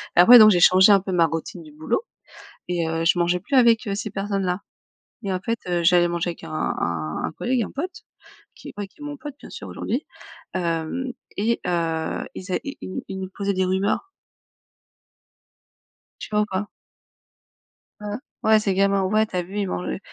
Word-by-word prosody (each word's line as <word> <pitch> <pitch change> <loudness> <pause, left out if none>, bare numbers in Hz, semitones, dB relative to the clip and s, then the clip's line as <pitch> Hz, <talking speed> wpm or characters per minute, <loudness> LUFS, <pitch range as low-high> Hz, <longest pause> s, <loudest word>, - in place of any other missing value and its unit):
et - - +3
après, 235 +8 +10
donc, 215 -1 +9
j'ai 180 - +3
changé 185 +4 +7
un 200 - +7
peu 190 0 -5
ma 175 -2 +4
routine 165 +2 -5
du 155 - -14
boulot 155 - -2 0.7
et 175 -2 0
heu, 165 0 -1
je 165 - +3
mangeais 175 +1 +1
plus 270 +9 -1
avec, 235 -1 +5
heu, 200 - -1
ces 210 +1 -4
personnes-là 195 -2 -2 0.6
et 200 -3 -2
en 185 - -2
fait, 230 +4 -2
heu, 175 -1 0
j'allais 175 0 +5
manger 170 0 -1
avec 170 - -10
un - - -9
un 85 - -2
un - - -2
collègue, 245 +7 -1
un - - -8
pote, 355 +7 -5 0.5
qui - - -11
ouais, 205 -1 -4
qui 245 - -26
est - - -8
mon 295 0 -5
pote, 295 0 -8
bien - - -12
sûr - - -8
aujourd'hui, 260 +6 -3 0.5
hem 170 +8 -2 0.3
et 230 +3 +1
heu, 165 -2 -1
ils 185 0 -7
é - - +1
i 280 - -6
i 185 - -5
ils 190 0 -6
nous 190 -1 -5
posaient 200 0 -1
des 185 0 +1
rumeurs. 190 - 0 2.1
Tu - - -7
vois 210 - +3
ou - - -1
pas? 195 0 -3 1.3
Heu, 210 +1 -4 0.2
ouais, 220 0 +5
c'est 200 -2 0
gamin: 195 0 +2
«Ouais, 215 +3 +2
tu 190 - -7
as 180 - +1
vu, 190 +4 -7
ils 200 - -1
mangent 180 - -3
heu, - - -3
190 Hz, 205 wpm, -23 LUFS, 175-215 Hz, 2.1 s, après